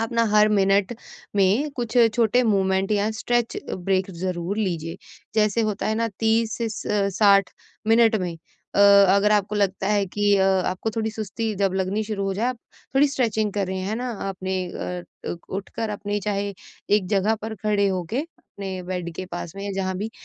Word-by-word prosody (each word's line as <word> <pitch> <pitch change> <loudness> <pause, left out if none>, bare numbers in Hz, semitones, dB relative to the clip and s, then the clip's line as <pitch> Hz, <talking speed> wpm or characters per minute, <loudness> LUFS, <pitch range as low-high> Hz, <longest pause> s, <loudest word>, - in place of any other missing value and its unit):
आप 225 +1 -2
ना 230 0 +3
हर 210 0 +6
मिनट 200 +1 +2 0.4
में 205 +10 +3
कुछ 240 -1 -3 0.2
छोटे 235 +2 +3
मूवमेंट 195 -3 +1
या 210 +1 +1
स्ट्रेच 235 +2 -1 0.2
ब्रेक 190 +1 0
ज़रूर 180 +2 -3
लीजिए। 170 -5 -2 0.4
जैसे 215 0 +2
होता 215 -2 -1
है 215 - +1
ना 230 +1 0
30 225 0 +2
से 230 -1 -1
स 210 - -6 0.3
साठ 200 -2 +5 0.4
मिनट 225 0 +5
में 180 -2 -2 0.4
अ, - - 0
अगर 200 0 +6
आपको 205 0 +1
लगता 195 -2 0
है 205 -1 +2
कि 205 +2 +2
अ 190 - +3 0.2
आपको 185 +4 -2
थोड़ी 220 0 0
सुस्ती 220 0 -3
जब 195 -1 +1
लगनी 190 +3 0
शुरू 205 -2 -3
हो 195 0 -1
जाए, 220 +5 0
आप 255 - -3 0.4
थोड़ी 285 +2 +5
स्ट्रेचिंग 220 -6 0
करें, 190 -2 -2
है 200 +3 -2
ना 250 +1 -3 0.2
अपने 190 0 -3
अ 180 0 -5 0.3
अ, - - -2
उठकर 205 +3 -4
अपने 205 0 -3
चाहे 200 0 -2 0.4
एक 205 -3 +3
जगह 205 +2 +2
पर 220 0 -4
खड़े 205 -1 +2
होके 185 +6 -2 0.4
अपने 190 -2 -5
बेड 180 -1 -4
के 185 - -4
पास 175 -2 -6
में 195 - -6
या 200 - -3
जहाँ 190 -1 -2
भी, 210 +4 -4
205 Hz, 185 wpm, -24 LUFS, 190-220 Hz, 0.4 s, हर